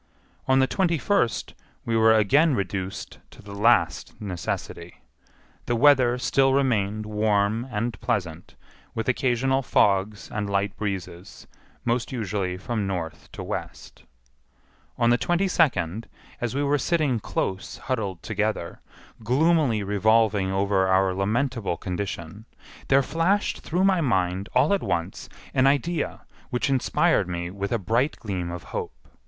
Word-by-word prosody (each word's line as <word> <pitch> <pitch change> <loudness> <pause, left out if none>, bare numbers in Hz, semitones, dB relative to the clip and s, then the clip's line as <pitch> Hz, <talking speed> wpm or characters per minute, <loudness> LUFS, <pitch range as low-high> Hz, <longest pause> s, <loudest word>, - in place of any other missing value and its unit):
On 130 0 +4
the 130 - +5
twenty 170 +4 +1
first 145 - 0 0.3
we 115 - 0
were 110 0 +5
again 140 +8 +4
reduced 95 -1 -4
to - - -18
the 100 0 -10
last 100 -5 +2
necessity. 95 -5 -5 0.6
The 120 - +1
weather 125 -1 +5
still 135 +1 +2
remained 110 -6 +1
warm 105 +2 0
and 115 0 -3
pleasant, 90 -8 -3 0.4
with 115 - -3
occasional 130 +1 +1
fogs 105 -4 +1
and 105 -1 -3
light 100 0 0
breezes, 95 -3 -6 0.4
most 120 0 0
usually 100 -6 -2
from 105 0 -3
N. 85 -4 -2 0.2
to - - -7
W. - - -3 1.3
On 120 -1 +3
the 120 - +3
twenty 175 +3 +1
second, 115 - +1 0.3
as 120 +1 -2
we 145 - 0
were 145 0 +2
sitting 145 -5 +1
close 95 -2 -3
huddled 100 -9 -3
together, 105 -5 -2 0.4
gloomily 135 -2 +2
revolving 105 -1 +2
over 95 0 +1
our 95 0 +3
lamentable 110 0 -1
condition, 95 +1 -5 0.4
there 135 0 +4
flashed 175 +8 0
through 180 +3 -1
my 190 -3 +3
mind 95 - 0
all 140 +9 +4
at 200 - +1
once 85 +3 -3 0.2
an 130 +1 +4
idea 145 +5 0 0.3
which 130 +2 0
inspired 130 -8 +2
me 85 0 -4
with 100 +1 -4
a 120 - +2
bright 115 - 0
gleam 95 -6 -4
of 85 0 -6
hope. - - -4
110 Hz, 135 wpm, -25 LUFS, 95-130 Hz, 1.3 s, the